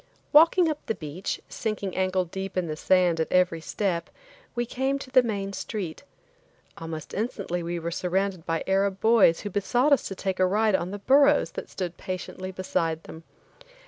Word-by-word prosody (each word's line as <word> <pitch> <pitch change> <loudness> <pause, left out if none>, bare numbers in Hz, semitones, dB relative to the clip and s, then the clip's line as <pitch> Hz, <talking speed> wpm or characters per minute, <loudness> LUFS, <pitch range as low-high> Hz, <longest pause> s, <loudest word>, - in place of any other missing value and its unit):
Walking 330 +3 +6
up 305 -2 -3
the 225 - 0
beach, 165 +3 -5
sinking 205 -4 -3
ankle 185 -1 +1
deep 190 +2 -6
in 180 - +1
the 155 -2 -4
sand 180 0 +3
at 160 - -1
every 180 -2 +2
step, 170 -1 -2 0.5
we 240 0 0
came 265 +3 -1
to 275 -1 -10
the 255 -1 +7
main 200 -4 -3
street. 190 -6 -5 0.7
Almost 160 -1 -7
instantly 200 -5 -2
we 170 +1 -3
were 170 0 -4
surrounded 185 0 -1
by 165 -1 -2
Arab 195 0 +1
boys 220 -7 +5
who 205 - -5
besought 245 +9 +2
us 280 - +2
to 195 - -6
take 190 -1 -3
a 185 - +5
ride 210 +2 +2
on 180 -1 0
the 205 - -5
burros 275 +7 +4
that - - -7
stood 180 -3 -5
patiently 185 0 -5
beside 165 -3 -2
them. 160 - -10
190 Hz, 180 wpm, -26 LUFS, 175-215 Hz, 0.7 s, the